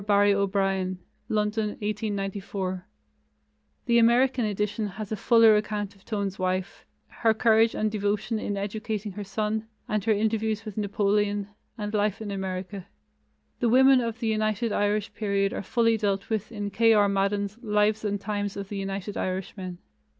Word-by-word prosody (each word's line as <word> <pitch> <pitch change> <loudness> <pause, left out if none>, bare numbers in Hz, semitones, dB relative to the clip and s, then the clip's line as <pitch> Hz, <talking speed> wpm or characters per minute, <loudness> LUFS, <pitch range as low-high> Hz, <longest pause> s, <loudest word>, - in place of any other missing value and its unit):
Barry 205 0 +4
O'Brien 195 -1 0 0.3
(London, 210 0 0
1894). 200 -3 -3 1.0
The 235 -1 +4
American 245 +1 +4
edition 210 +1 -1
has 205 +2 -7
a - - 0
fuller 225 +1 +6
account 210 -1 -2
of 195 - -23
Tone's 200 -3 -3
wife, 185 +1 -2 0.2
her 225 -1 +1
courage 225 0 +4
and 215 0 0
devotion 210 +2 -1
in 205 -1 -3
educating 210 +1 -3
her 205 +2 -6
son, 215 +2 -2 0.2
and 210 -2 -1
her 225 - +3
interviews 220 +1 0
with 215 -3 -7
Napoleon, 205 0 0 0.3
and 210 -1 -4
life 210 0 +1
in 215 -2 -5
America. 190 0 -5 0.7
The 240 - +2
women 260 +2 +6
of 230 -1 -3
the 230 - -2
United 215 +1 0
Irish 205 +1 0
period 200 -2 0
are - - -3
fully 230 +2 +2
dealt 200 -1 -1
with 215 0 -2
in 205 -2 -4
K. 225 +2 +4
R. 205 -1 +5
Madden's 200 +2 0
Lives 210 -1 +1
and 205 -1 -1
Times 205 -1 -3
of 200 -1 -6
the 205 - -4
United 195 +1 -4
Irishmen. 185 -1 -4
210 Hz, 155 wpm, -26 LUFS, 200-220 Hz, 1.0 s, fuller